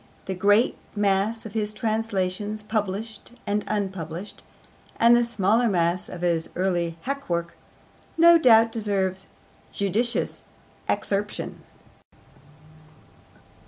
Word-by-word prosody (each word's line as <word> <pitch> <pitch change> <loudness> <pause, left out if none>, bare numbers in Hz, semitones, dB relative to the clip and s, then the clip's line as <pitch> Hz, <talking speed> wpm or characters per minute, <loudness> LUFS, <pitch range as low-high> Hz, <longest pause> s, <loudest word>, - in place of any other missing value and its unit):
The 190 - -3
great 205 +5 +3 0.2
mass 205 +2 +1
of 215 - -8
his 210 -2 -1
translations, 210 -1 -2
published 215 +1 -4
and 205 0 0
unpublished, 190 -3 -4 0.6
and 235 +1 +7
the 240 - +4
smaller 230 +1 +2
mass 175 -1 0
of 175 - -8
his 170 -2 0
early 175 -2 -1
hackwork, 175 -12 -2 0.6
no 335 0 +7
doubt 230 -5 +6
deserves 195 -4 -1 0.4
judicious 215 +5 -1 0.5
excerption. 205 +1 -2
205 Hz, 95 wpm, -25 LUFS, 185-225 Hz, 0.6 s, and